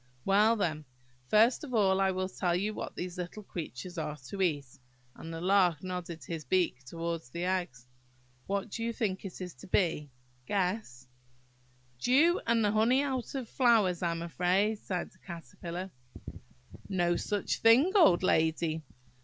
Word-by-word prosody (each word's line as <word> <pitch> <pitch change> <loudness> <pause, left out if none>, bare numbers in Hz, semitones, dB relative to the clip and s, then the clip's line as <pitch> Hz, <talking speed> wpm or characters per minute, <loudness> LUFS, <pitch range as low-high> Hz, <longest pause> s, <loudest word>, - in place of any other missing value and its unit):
"Well, 210 +4 +4
then, 155 -7 -2 0.4
first 225 - +4
of 255 -5 -4
all, 195 -3 +3
I 195 - +3
will 185 0 -1
tell 180 -2 -1
you 205 +4 -1
what - - -6
these 180 0 -5
little 180 +4 -6
creatures 175 -1 -6
are 150 -1 -4
to 195 - -4
eat"–and 125 -3 -4
the 165 - -5
Lark 180 -4 +3
nodded 180 -3 -5
his 165 -2 -5
beak 155 -3 0
towards 165 -1 -4
the 170 +6 -4
eggs. 175 -10 -2 0.6
"What 200 +1 -2
do 230 - -4
you 230 0 -1
think 195 -5 -2
it 190 - -7
is 180 -2 -6
to 125 - -14
be? 165 -6 +1 0.4
Guess!" 180 - -2 0.9
"Dew, 300 - +4
and 230 -2 +3
the 205 - +2
honey 235 +6 +3
out 265 -2 -3
of 260 -4 -3
flowers, 220 -9 +3
I 175 - +1
am 170 0 -3
afraid," 185 +5 +1
sighed 180 -4 -4
the - - -25
Caterpillar. 170 +2 -7 1.0
"No 175 -3 +1
such 205 +3 -1
thing, 245 +10 +6
old 190 - +6
lady! 160 -1 +1
185 Hz, 160 wpm, -30 LUFS, 165-210 Hz, 1.0 s, thing